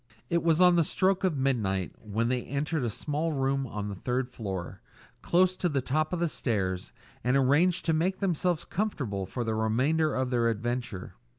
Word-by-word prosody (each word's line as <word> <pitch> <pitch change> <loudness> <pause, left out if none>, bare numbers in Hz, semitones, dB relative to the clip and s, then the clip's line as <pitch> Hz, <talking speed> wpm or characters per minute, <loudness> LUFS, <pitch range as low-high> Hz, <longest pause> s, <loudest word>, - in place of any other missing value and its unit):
It 170 0 +2
was 165 -1 +3
on 180 -1 +6
the 170 - +5
stroke 190 +4 +1
of 180 -6 +1
midnight 105 -9 0
when 110 +2 -1
they 125 0 0
entered 145 +3 -2
a 120 - 0
small 150 +8 -2
room 135 -1 0
on 105 -2 -4
the 100 - -4
third 125 +6 -2
floor, 95 -5 -5 0.4
close 185 +1 +3
to 180 - 0
the 140 -3 0
top 155 +4 0
of 180 - -1
the 170 - +3
stairs, 95 - -2 0.3
and 125 +3 +3
arranged 150 +7 +3
to 165 - +2
make 180 +4 +1
themselves 180 -3 0
comfortable 130 - -2
for 120 +6 -3
the 110 -1 -1
remainder 130 +9 +1
of 130 -1 -1
their 120 -2 +2
adventure. 115 -3 -3
135 Hz, 190 wpm, -28 LUFS, 110-165 Hz, 0.4 s, on